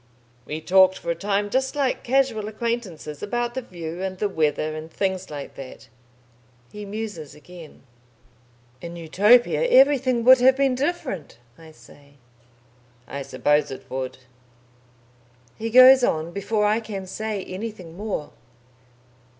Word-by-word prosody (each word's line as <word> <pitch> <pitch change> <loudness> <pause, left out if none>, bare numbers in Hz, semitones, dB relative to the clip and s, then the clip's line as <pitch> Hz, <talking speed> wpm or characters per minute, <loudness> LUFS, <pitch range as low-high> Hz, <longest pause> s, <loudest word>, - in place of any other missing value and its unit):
"We 155 +1 -5
talked 190 +2 +4
for 170 - -4
a - - +1
time 200 +3 -2
just 265 +1 0
like 275 -3 0
casual 250 -5 +1
acquaintances 215 -9 -4
about 240 +3 -2
the 260 - -3
view 175 -5 -8
and 190 -1 -4
the 205 - 0
weather, 155 -3 -1
and 155 +1 -8
things 190 0 -2
like 145 -2 -7
that." 135 -2 -11 0.8
He 210 0 -8
muses 205 -7 -7
again. 165 0 -14 1.0
"In 170 0 -8
Utopia 205 - +3
everything 265 - +4
would 260 +1 +7
have 260 +1 +5
been 270 -1 +2
different," 260 - -3 0.2
I 160 +2 -15
say. 140 +1 -19 0.9
"I 140 - -6
suppose 140 +3 +1
it 135 - -10
would." 130 -1 -4 1.4
He 225 +1 -4
goes 255 +2 +8
on 160 -5 0
before 210 +2 -1
I 210 +2 +2
can 205 -4 -7
say 210 +1 -4
anything 185 -4 -7
more. 200 -6 -5
200 Hz, 135 wpm, -23 LUFS, 160-235 Hz, 1.4 s, goes